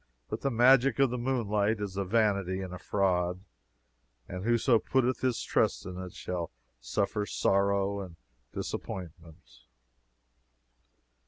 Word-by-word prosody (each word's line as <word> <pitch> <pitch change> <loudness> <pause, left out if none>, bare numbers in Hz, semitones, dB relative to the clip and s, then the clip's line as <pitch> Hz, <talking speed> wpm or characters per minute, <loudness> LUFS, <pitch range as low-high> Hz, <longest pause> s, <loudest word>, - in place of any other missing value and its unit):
But - - -4
the 140 - +1
magic 130 +1 +5
of 135 -3 +3
the 125 - -2
moonlight 110 -4 0
is 100 -2 -4
a 100 - 0
vanity 100 -2 +1
and 95 -1 -6
a 90 - -7
fraud; 90 -2 0 0.9
and 90 +1 -6
whoso 120 +1 +3
putteth 130 +1 +1
his 130 -2 0
trust - - +1
in 90 0 -6
it 90 -1 -8
shall 85 -2 -4 0.3
suffer 105 0 -1
sorrow 100 0 +1
and 90 -4 -7 0.4
disappointment. 85 -3 -7
100 Hz, 130 wpm, -30 LUFS, 95-120 Hz, 0.9 s, magic